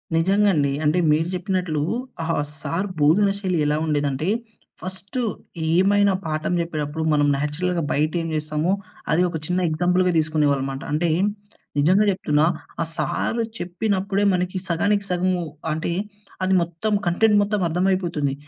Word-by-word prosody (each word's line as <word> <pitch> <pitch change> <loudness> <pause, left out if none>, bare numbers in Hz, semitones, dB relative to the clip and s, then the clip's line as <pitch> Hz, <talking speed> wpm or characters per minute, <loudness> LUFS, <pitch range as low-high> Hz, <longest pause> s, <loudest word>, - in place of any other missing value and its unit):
నిజంగా 200 +5 +3
అండి. 140 -3 +2
అంటే 155 +4 +3
మీరు 160 +3 +2
జెప్పినట్లు 180 -4 -1 0.4
ఆ - - -3 0.4
సార్ 185 +7 -2
భోధనశైలి 190 +3 +2
ఎలా 150 +1 +1
ఉండేదంటే, 145 0 0 0.5
ఫస్టు 190 +6 -5 0.5
ఏమైనా 200 +2 +4
పాఠం 155 +2 -1
జెప్పేటప్పుడు 160 -2 -3
మనం 145 -1 +3
నేచురల్‌గా 165 +4 -1
బయట 155 +2 +1
ఏం 165 - -3
జేస్తామో, 155 +3 -1 0.4
అది 170 - +3
ఒక 165 - -3
చిన్న 180 +1 0
ఎగ్జాంపుల్‌గా 180 +3 +2
తీసుకునేవాళ్ళు 150 -3 +1
మాట. 135 - -6
అంటే, 165 +2 +1 0.7
నిజంగా 185 +8 +4
జెప్తున్నా. 155 -5 +2 0.4
ఆ - - +3
సార్ 155 - -1 0.2
చెప్పినప్పుడే 195 +2 -1
మనకి 180 +1 -1
సగానికి 200 +4 +1
సగము 180 0 +1 0.3
అంటే 160 +2 -2 0.5
అది 190 - +2
మొత్తం 175 +6 -2
కంటెంట్ 210 +4 +4
మొత్తం 205 0 0
అర్థమైపోతుంది. 175 -5 0
175 Hz, 130 wpm, -23 LUFS, 155-190 Hz, 0.7 s, ఏమైనా